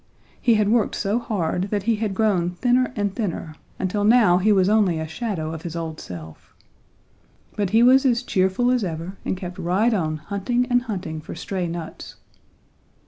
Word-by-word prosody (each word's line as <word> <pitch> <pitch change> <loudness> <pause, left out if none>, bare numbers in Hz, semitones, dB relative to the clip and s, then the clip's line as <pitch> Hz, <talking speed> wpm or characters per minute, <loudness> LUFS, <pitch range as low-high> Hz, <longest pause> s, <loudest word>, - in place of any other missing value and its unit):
He 235 -3 +4
had 210 -1 +2
worked 230 -1 +2
so 205 +4 0
hard 190 -6 -1
that 205 -1 -1
he 225 +1 +1
had 210 -3 -2
grown 190 -5 +2
thinner 250 +5 +2
and 205 -3 -1
thinner 175 -7 -3 0.2
until 195 +2 -1
now 215 -5 +5
he 210 +4 +3
was 190 -2 +4
only 205 -5 +3
a 160 - -4
shadow 165 -4 -4
of 160 - -6
his 170 0 -6
old 165 -2 -5
self. 80 -3 -10 1.0
But 205 -3 -1
he 225 +4 +4
was 260 +2 +6
as 245 -2 +2
cheerful 190 +4 +1
as 250 -3 +1
ever 170 +2 -5
and - - -2
kept 180 -1 -7
right 195 +7 +2
on 155 -6 -1
hunting 200 +9 -1
and 245 0 +4
hunting 180 -9 -5
for - - -8
stray 185 -3 -3
nuts. 165 -1 -7
195 Hz, 185 wpm, -23 LUFS, 170-225 Hz, 1.0 s, was